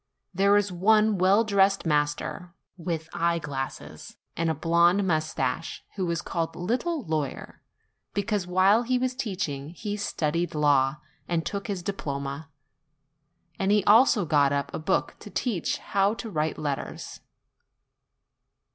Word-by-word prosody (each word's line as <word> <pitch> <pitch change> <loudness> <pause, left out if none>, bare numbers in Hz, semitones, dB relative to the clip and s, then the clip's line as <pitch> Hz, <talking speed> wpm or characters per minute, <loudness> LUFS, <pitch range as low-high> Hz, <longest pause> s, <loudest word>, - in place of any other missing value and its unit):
There 200 +3 +4
is 205 -1 0
one 210 +3 +3
welldressed 195 0 +3
master, 150 +3 -1 0.2
with 165 -2 -4
eye 170 0 +1
glasses, 135 -4 -6 0.2
and 170 0 0
a 160 - 0
blonde 170 +5 +3
moustache, 160 -1 -1
who 185 -4 -2
is 170 0 -2
called 165 -1 -2
the - - -13
little 255 - -1
lawyer, 155 -4 -4 0.5
because, 205 -2 -1
while 190 +5 +4
he 250 +1 0
was 255 0 -1
teaching, 165 - -3
he 205 +5 -5
studied 170 -5 -2
law 140 -2 +3 0.3
and 165 -2 -1
took 200 -1 -4
his 195 -4 -3
diploma; 140 -5 -4 1.1
and 195 +1 +1
he 210 -1 +4
also 215 -1 +5
got 145 -3 +3
up 140 0 -2
a - - -3
book 155 - -1
to - - -10
teach 215 - -1
how 200 +2 +1
to 225 -1 -7
write 155 -2 -1
letters. 145 -3 -5
175 Hz, 140 wpm, -26 LUFS, 155-205 Hz, 1.1 s, also